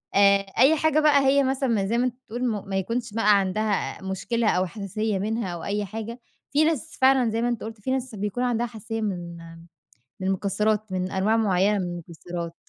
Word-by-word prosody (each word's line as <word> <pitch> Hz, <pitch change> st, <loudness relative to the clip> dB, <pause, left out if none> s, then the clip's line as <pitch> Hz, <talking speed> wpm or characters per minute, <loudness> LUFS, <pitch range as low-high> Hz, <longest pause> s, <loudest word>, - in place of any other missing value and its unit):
آآ 200 Hz, 0 st, +6 dB, 0.2 s
أي 275 Hz, +6 st, +6 dB
حاجة 315 Hz, 0 st, +2 dB
بقى 290 Hz, -3 st, +4 dB
هي 280 Hz, +1 st, +4 dB
مثلًا 265 Hz, 0 st, 0 dB
م 205 Hz, -4 st, +1 dB
زي 230 Hz, -, 0 dB
ما 245 Hz, -, +2 dB
أنت 245 Hz, -, -2 dB
بتقول 240 Hz, +3 st, -3 dB
م 205 Hz, -4 st, -3 dB
ما 195 Hz, -, -2 dB
يكونش 230 Hz, +3 st, -2 dB
بقى 210 Hz, -2 st, +4 dB
عندها 200 Hz, +2 st, -1 dB
مشكلة 220 Hz, +4 st, -1 dB
أو 185 Hz, +1 st, +2 dB
حساسية 205 Hz, +2 st, -3 dB
منها 215 Hz, -3 st, -2 dB
أو 170 Hz, -, -7 dB
أي 205 Hz, 0 st, -1 dB
حاجة، 225 Hz, +4 st, -6 dB, 0.3 s
في 295 Hz, +2 st, +4 dB
ناس 320 Hz, 0 st, -1 dB
فعلًا 260 Hz, -2 st, +5 dB
زي 225 Hz, +1 st, -1 dB
ما 240 Hz, -, +1 dB
أنت 240 Hz, -2 st, -3 dB
قُلت، 220 Hz, -1 st, -8 dB
في 260 Hz, -, -2 dB
ناس 260 Hz, -3 st, -2 dB
بيكون 210 Hz, +4 st, -2 dB
عندها 240 Hz, -1 st, +1 dB
حساسية 225 Hz, -1 st, -5 dB
من 175 Hz, -5 st, -4 dB, 0.8 s
من 190 Hz, -, -2 dB
المكسرات 210 Hz, +2 st, 0 dB
من 185 Hz, 0 st, -2 dB
أنواع 200 Hz, +4 st, +1 dB
معيّنة 205 Hz, -1 st, +2 dB
من 185 Hz, -, -1 dB
المكسرات. 170 Hz, 0 st, -7 dB
215 Hz, 205 wpm, -25 LUFS, 195-240 Hz, 0.8 s, آآ